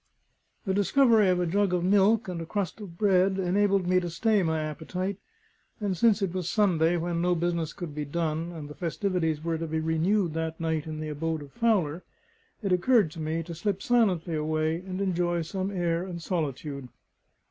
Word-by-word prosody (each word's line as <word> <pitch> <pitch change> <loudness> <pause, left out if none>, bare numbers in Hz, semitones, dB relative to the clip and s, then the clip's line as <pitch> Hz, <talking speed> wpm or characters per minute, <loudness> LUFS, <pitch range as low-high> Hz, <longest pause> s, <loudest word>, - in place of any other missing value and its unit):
The 190 - 0
discovery 220 0 +4
of 180 -1 +2
a 180 - +1
jug 195 +2 +1
of 175 - -1
milk 205 +4 +3
and 175 -2 -4
a - - -5
crust 205 +3 -3
of 175 -5 -9
bread 190 -1 +3
enabled 195 +1 +2
me 185 +1 +3
to 175 -1 -4
stay 210 +5 +2
my 160 -2 0
appetite; 180 +6 -4 0.6
and 200 -3 -1
since 215 +2 +3
it 185 -3 -1
was 180 -2 -2
Sunday, 175 -5 +2
when 170 0 -1
no 180 0 +2
business 170 -1 -1
could 175 -5 -7
be 150 0 -3
done, 160 +2 -2
and 160 -4 -7
the 150 - -9
festivities 165 -2 -1
were 165 -1 -1
to 165 - -3
be 160 0 -1
renewed 165 +3 +1
that 160 0 -3
night 160 -2 -1
in 155 0 -5
the 155 - -4
abode 160 +1 -2
of 140 - -13
Fowler, 185 - +1 0.6
it 195 - -1
occurred 200 -1 +3
to 165 - -9
me 160 +1 -2
to 170 +1 -7
slip 195 +3 -2
silently 195 -9 +2
away 155 +1 0
and 185 +2 -5
enjoy 175 -3 0
some 190 +3 -3
air 175 -3 0
and 180 -2 -6
solitude. 145 -6 -3
175 Hz, 195 wpm, -27 LUFS, 160-195 Hz, 0.6 s, discovery